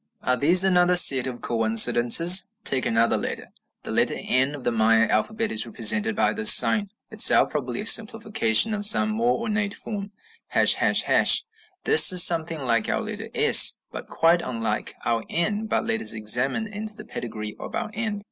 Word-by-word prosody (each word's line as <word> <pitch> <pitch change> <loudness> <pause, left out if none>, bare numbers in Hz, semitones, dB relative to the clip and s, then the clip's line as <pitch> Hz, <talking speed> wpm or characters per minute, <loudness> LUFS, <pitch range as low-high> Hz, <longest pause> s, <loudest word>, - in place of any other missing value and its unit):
Are 125 - -1
these 170 +9 +2
another 180 -1 +1
set 135 -7 +4
of 125 -2 -9
coincidences? 120 - +3
Take 130 -9 0
another 115 +1 -1
letter: - - -8 0.3
The - - -8
letter - - -1
n 130 +3 -2
of 140 - -12
the 120 - -2
Maya 110 0 0
alphabet 220 - -3
is 110 +2 +1
represented 205 - 0
by 225 - -1
this 215 -1 +3
sign, 205 -3 +4 0.2
itself 220 -1 +3
probably 125 -5 -6
a - - -8
simplification 220 - +1
of 205 -1 -1
some 215 0 +2
more 235 +3 -2
ornate 210 -3 -5
form, 200 -2 -9 0.2
###. 460 - -26 1.3
This 440 - +5
is 180 -1 +5
something 165 -4 0
like 115 -3 -2
our - - -3
letter 215 0 -8
S, 450 +1 +5
but - - -9
quite 170 +1 0
unlike 115 -5 -6
our 115 -1 -3
N. 205 +6 -3
But - - -3
let 225 -1 -2
us - - +1
examine 120 - 0
into 215 0 -8
the 215 - -12
pedigree 110 - -8
of - - -10
our - - -6
n. 215 -2 -5
175 Hz, 175 wpm, -21 LUFS, -, 1.3 s, This